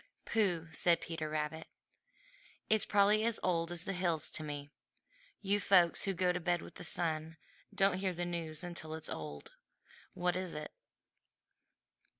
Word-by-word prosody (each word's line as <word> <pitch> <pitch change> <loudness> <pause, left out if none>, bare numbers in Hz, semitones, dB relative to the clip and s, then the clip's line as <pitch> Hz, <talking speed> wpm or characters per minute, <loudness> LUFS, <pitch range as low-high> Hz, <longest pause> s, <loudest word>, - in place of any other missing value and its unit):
"Pooh!" 180 -7 +1
said 170 +2 +3
Peter 160 -2 -4
Rabbit, 155 +1 -3 1.0
"it's 215 -2 +4
probably 205 +1 +5
as 230 -1 +1
old 170 -2 +1
as 175 0 -2
the 195 - -2
hills 170 -5 0
to 160 - -4
me. 145 -1 -5 0.7
You 200 0 +2
folks 180 -4 +4
who 195 -1 0
go 180 0 +2
to 180 - -1
bed 175 -1 0
with - - -11
the - - -9
sun 160 -2 -1 0.3
don't 195 -2 +2
hear 190 -1 0
the 175 0 -3
news 170 -2 -3
until 170 -3 -5
it's 160 - -5
old. 75 -2 -6 0.6
What 180 0 +1
is 185 -3 -3
it?" 150 0 -5
175 Hz, 155 wpm, -34 LUFS, 160-185 Hz, 1.0 s, probably